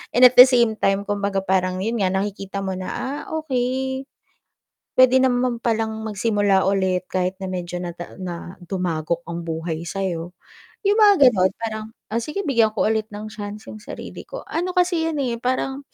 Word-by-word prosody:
and 245 - +5
at 250 - +8
the 250 - +12
same 235 -4 +2
time 195 +1 +2
kumbaga 200 -1 -1
parang 185 0 0
yun 230 +1 -1
nga 190 - +2
nakikita 195 0 -3
mo 190 - -2
na, 185 - -5
ah, 280 +3 -4 0.2
okey. 265 -1 -2 0.9
Pwede 255 0 +6
naman 250 -2 +1
palang 225 -1 0 0.2
magsimula 205 -2 +2
ulit, 190 -2 +1
kahit 185 0 0
na 190 - -3
medyo 180 -1 -4
na 175 - -4 0.3
na 175 0 -6
dumagok 170 -2 -2
ang 170 0 -5
buhay 165 0 -4
sa'yo, 175 -2 -3 0.5
yung 410 +1 +2
mga 400 - +7
ganun 190 -4 +2
parang, 220 -1 -3 0.2
ah, 230 - 0
sige 300 +12 -3
bigyan 230 - +2
ko 215 - +1
ulit 220 -1 0
ng 215 +1 -6
chance 210 0 -8
yung 215 - -9
sarili 210 - -9
ko - - -7
ano 360 +2 -3
kasi 350 -2 +2
yun, 315 -2 -2
eh, 235 -3 -2
parang 265 +3 -2
215 Hz, 175 wpm, -22 LUFS, 185-255 Hz, 0.9 s, the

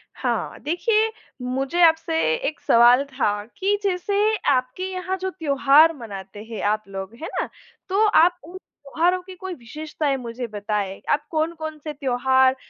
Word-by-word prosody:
हाँ। - - -2
देखिए, 430 +8 +2 0.3
मुझे 265 +7 -1
आपसे 325 0 +3 0.3
एक 310 - -4
सवाल 240 +3 +5
था 265 -6 0 0.2
कि 400 +2 +1
जैसे 390 +1 -1 0.4
आपके 255 +6 -1
यहाँ 370 0 -3
जो 380 0 -3
त्योहार 300 -1 +4
मनाते 205 -3 -8
हैं 225 -1 -7
आप 215 0 -1
लोग, 195 +2 -7
है 325 - -4
ना? - - -3 0.4
तो 400 +3 +3
आप 350 -3 +5
उन 350 +4 -10
त्योहारों 345 +2 -1
की 370 0 -11
कोई 375 0 -6
विशेषताएँ 295 +2 -3
मुझे 240 0 -5
बताएँ। 205 -2 -3
आप 295 +1 +1
कौन-कौन 315 -1 -2
से 305 -1 -5
त्योहार, 260 -1 +2
295 Hz, 150 wpm, -23 LUFS, 245-350 Hz, 0.4 s, सवाल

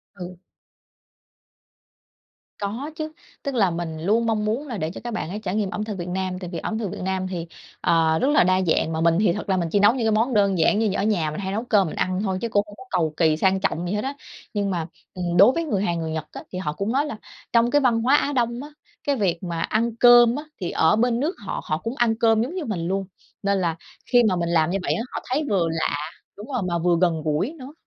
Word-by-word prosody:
Ừ. 180 -1 -8 2.2
Có 230 +9 -4
chứ. 310 0 -4 0.3
Tức 280 -2 -3
là, 200 -6 +3
mình 165 -2 -4
luôn 215 +8 +1
mong 215 -2 0
muốn 235 +8 -1
là 240 -5 -4
để 160 -4 -2
cho - - -9
các 240 -1 -4
bạn 220 - -3
ấy 205 +4 -4
trải 185 0 -2
nghiệm 210 -3 0
ẩm 210 - -3
thực 215 -2 -5
Việt 175 -1 -5
Nam, 185 0 -2
tại 180 -2 -6
vì - - -2
ẩm 220 - -3
thực 205 -5 -3
Việt - - -7
Nam 190 0 -1
thì, 175 -3 -5 0.3
ờ, 160 -1 +3
rất - - +1
là 295 - +5
đa 185 +1 +3
dạng. 165 -2 +1
Mà 160 - -1
mình 165 0 +3
thì 205 -5 +3
thật 210 - -5
ra 195 - +1
là - - +1
mình 170 -2 -1
chỉ 205 - +3
nấu 205 +3 +6
những 245 -3 -1
cái - - +3
món 225 +4 +1
đơn 200 -3 +3
giản 185 +6 +3
như 215 -3 +1
ở - - 0
nhà, 180 -8 +1
mình 155 - -5
hay 190 -1 -3
nấu 220 +3 -2
cơm 205 -6 +3
mình - - -6
ăn 185 0 -1
thôi. 190 -3 -1
Chứ 235 - -2
cũng 205 -2 +2
hông 205 - -12
có - - -11
cầu 165 -4 0
kỳ 160 -2 +3
sang 190 +3 +2
trọng 180 -2 -1
gì 180 - -2
hết 210 - -1
á. 270 +2 -2 0.4
Nhưng 200 -2 0
mà, 170 -3 -2 0.3
ừm, 175 -1 -2
đối 200 +7 +8
với 335 +5 -1
người 205 -11 -1
Hàn, 170 -4 0
người 160 -1 -3
Nhật 160 -1 -3
á, - - -8
thì 185 - -4
họ 150 -5 -2
cũng 200 +7 -2
nói 275 +4 +1
là 290 -8 -5 0.4
trong 235 0 +4
văn 235 -3 +3
hóa 260 +5 +4
Á 290 0 +1
Đông 240 0 0
á, 295 - -9 0.3
cái 285 - +1
việc 185 -7 -1
mà 170 -2 -3
ăn 225 +5 0
cơm 240 0 +7
á, 295 - -4 0.2
thì 175 - -2
ở 160 +6 +3
bên 235 +1 +1
nước 310 +8 -1
họ, - - -3
họ 155 - -1
cũng 230 +9 -5
ăn 235 -2 +2
cơm 225 -1 +4
giống 265 +10 -3
như 360 -5 -3
mình 175 -7 -3
luôn. 195 +1 -1 0.4
Nên 200 0 +2
là 170 -2 0 0.3
khi 245 -1 +4 0.2
mình 170 0 -1
làm 165 -1 +3
như 190 - 0
vậy - - +1
á, - - -2
họ - - -3
thấy 275 +5 +1
vừa 185 -5 +2
lạ 160 -2 -1 0.4
đúng 210 +3 -9
rồi, 255 -5 -2
mà 170 -1 0
vừa 175 0 +2
gần 170 -3 +2
gũi 155 - 0
nữa. 265 +2 -9
200 Hz, 275 wpm, -23 LUFS, 175-230 Hz, 2.2 s, đối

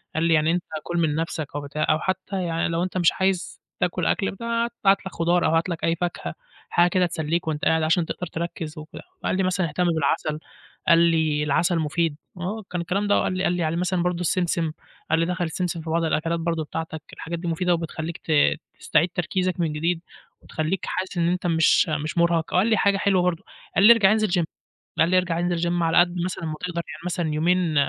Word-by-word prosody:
قال 160 - +1
لي: 165 0 +3
"يعني 155 0 +3
أنت 175 0 0 0.2
كُلّ 175 - -3
من 160 -3 +1
نفسك 160 -1 -2
أو 145 - -2
بتاع 150 +2 -2
أو 155 - +3
حتى 185 +1 -2
يعني 165 -1 0
لو 170 +1 0
أنت 185 0 -3
مش 175 -2 +4
عايز 190 -1 -1 0.2
تاكل 180 -1 0
أكْل 195 - +1
ب 195 - -10
هات 235 0 0 0.3
لك 190 - -5
خضار 170 +1 +2
أو - - +3
هات 165 +3 +1
لك 170 -2 -4
أي 165 - +2
فاكهة 175 +1 -3 0.4
حاجة 175 +1 +4
كده 180 0 +2
تسلّيك 165 0 -2
وأنت 155 -1 -2
قاعد 160 0 +3
عشان 160 +2 +2
تقدر 180 - -5
تركز 165 -2 -5
وكده"، 155 0 -9 0.2
وقال 185 - 0
لي 190 - +1
مثلًا: 185 -2 0
"اهتم 180 +4 0
بالعسل"، 155 -1 0 0.5
قال 165 - +7
لي: 160 -3 +2
"العسل 165 +4 +2
المفيد"، 160 0 0 0.2
آه 205 +5 -4
كان 180 -1 -2
الكلام 195 +4 -1
ده 205 - +4
وقال - - 0
لي 185 - -1
قال 175 - +2
لي 175 -1 -1
على 160 +1 0
مثلًا 180 0 0
برضو 180 0 -1
السمسم، 170 -2 0 0.4
قال 160 - +3
لي: 165 - +2
"دخّل 180 0 -2
السمسم 170 0 -3
في 160 - -7
بعض 165 +1 +1
الأكلات 165 +1 0
برضو 165 -1 -1
بتاعتك، 160 +1 -5
الحاجات 170 +1 -5
دي 175 - -5
مفيدة 175 +2 +1
وبتخلّيك 165 0 -4
ت 160 - -6 0.5
تستعيد 170 +4 +2
تركيزك 185 0 -1
من 165 -3 0
جديد 165 +3 -1 0.4
وتخلّيك 160 +4 -3
حاسس 185 -1 -3
إن 170 -1 +2
أنت 180 0 -1
مش 165 -1 +4
مش 155 +1 -2
مرهق"، 170 -1 +2
وقال 185 +4 +3
لي 220 -2 +3
حاجة 200 0 +3
حلوة 195 -2 +2
برضو، 175 -2 0 0.3
قال - - +4
لي: 235 - +11
"ارجع 205 -4 +4
انزل 215 0 +2
gym"، - - -1 0.5
قال 165 - +4
لي: 185 - +3
"ارجع 175 -2 0
انزل 175 -1 0
gym 175 0 0
على 165 0 +3
قدّ 175 0 +4
مثلًا 180 -2 -4
ما 155 - -3
تقدر، 175 -1 -3
يعني - - -8
مثلًا 175 -2 -1
يومين 170 +1 +1
170 Hz, 225 wpm, -24 LUFS, 160-180 Hz, 0.5 s, لي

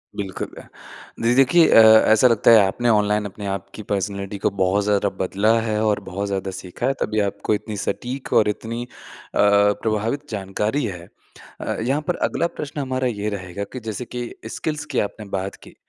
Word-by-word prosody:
बिल्कुल। 95 -2 -4 0.8
जी 115 +1 +3
देखिए 160 +6 +5
अ, - - +7 0.3
ऐसा 110 +3 +6
लगता 115 -1 +4
है, 115 - +9
आपने 120 +5 -1
ऑनलाइन 105 -1 +2
अपने 100 +1 -7
आपकी 100 +2 -5
पर्सनैलिटी 100 0 -2
को - - +5
बहुत 95 +2 +2
ज़्यादा 100 0 +1
बदला 100 +4 +2
है 110 -1 -1
और 105 -1 +2
बहुत 100 +2 -4
ज़्यादा 95 -1 -3
सीखा 90 +5 -6
है, 135 - +2
तभी 110 - 0
आपको 100 +2 -2
इतनी 105 0 -6
सटीक 125 +6 -4
और 105 - +4
इतनी 115 +3 -4
अ, - - -11 0.5
प्रभावित 105 +6 +2
जानकारी 105 +6 -1
है। 90 -5 -6 0.5
अ, - - -3
यहाँ 135 +6 0
पर 180 - +1
अगला 170 - 0
प्रश्न 150 -2 -7
हमारा 130 -1 -1
ये 105 -3 -2
रहेगा 95 -1 -5
कि 130 - -5
जैसे 110 0 -5
कि 120 0 -5 0.2
स्किल्स 150 +2 -4
की 145 - -1
आपने 105 +1 -3
बात 95 0 -3
की, - - -15
105 Hz, 180 wpm, -22 LUFS, 100-120 Hz, 0.8 s, है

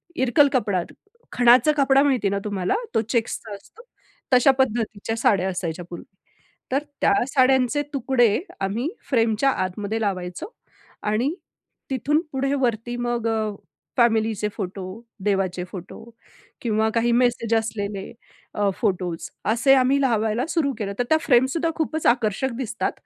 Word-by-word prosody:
इरकल 260 +2 +4
कपडा, 200 -8 +1 0.5
खणाचा 245 +5 +5
कपडा 275 -1 +4
माहिती 255 -8 +2
ना 200 0 -1
तुम्हाला 195 - -1 0.2
तो - - +4
चेक्सचा 230 -2 -2
असतो. 405 - -16 0.5
तश्या 255 +2 +6
पद्धतीच्या 225 -4 -1
साड्या 195 -4 +2
असायच्या 175 -2 -4
पूर्वी. 175 - -8 0.7
तर 275 +3 +1 0.2
त्या - - +4
साड्यांचे 265 +1 +3
तुकडे 245 -5 +2 0.2
आम्ही 215 +9 -1 0.2
फ्रेमच्या 230 0 +2
आतमध्ये 205 0 -2
लावायचो 195 - -3 0.5
आणि 225 +8 0 0.6
तिथून 275 +3 +1
पुढे 275 +1 -1
वरती 240 -1 -1
मग 240 -1 -1
अ, 220 -1 0 0.5
फॅमिलीचे 220 -3 +2
फोटो, 195 -1 -6 0.4
देवाचे 190 -3 0
फोटो 180 -1 -9 0.6
किंवा 220 -1 +1
काही 235 +1 +2
मेसेज 240 -1 +1
असलेले 205 -3 -3 0.4
अ, 205 -1 +1
फोटोस 180 -5 -1 0.2
असे 235 +5 +4
आम्ही 265 +1 +3
लावायला 225 -1 +1
सुरू 310 -5 +1
केलं 200 -3 -3
तर - - +3
त्या 315 - +5
फ्रेमसुद्धा 270 +5 +2
खूपच 315 -1 -2
आकर्षक 235 +2 +1
दिसतात 235 -3 -2
230 Hz, 130 wpm, -23 LUFS, 205-265 Hz, 0.7 s, तश्या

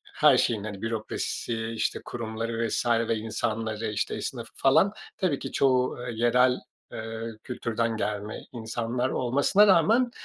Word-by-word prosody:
her 150 -4 +6
şeyin, 110 -5 +1
hani, 105 -2 -6
bürokrasisi, 115 0 -3
işte, 115 -1 -2
kurumları 115 0 -3
vs. - - -1 0.2
insanları, 110 0 -2
işte, 105 - -1
esnafı - - -5
falan 190 +9 +4 0.2
tabii 170 -7 0
ki - - -6
çoğu, 130 -2 +2
eee, 120 - -4
yerel, 125 +2 +4 0.3
eee, 110 +1 -5
kültürden 115 -2 -2
gelme 105 0 -3
insanlar 120 +2 -2
olmasına 140 - +3
rağmen 220 +8 +4
115 Hz, 130 wpm, -27 LUFS, 110-130 Hz, 0.3 s, her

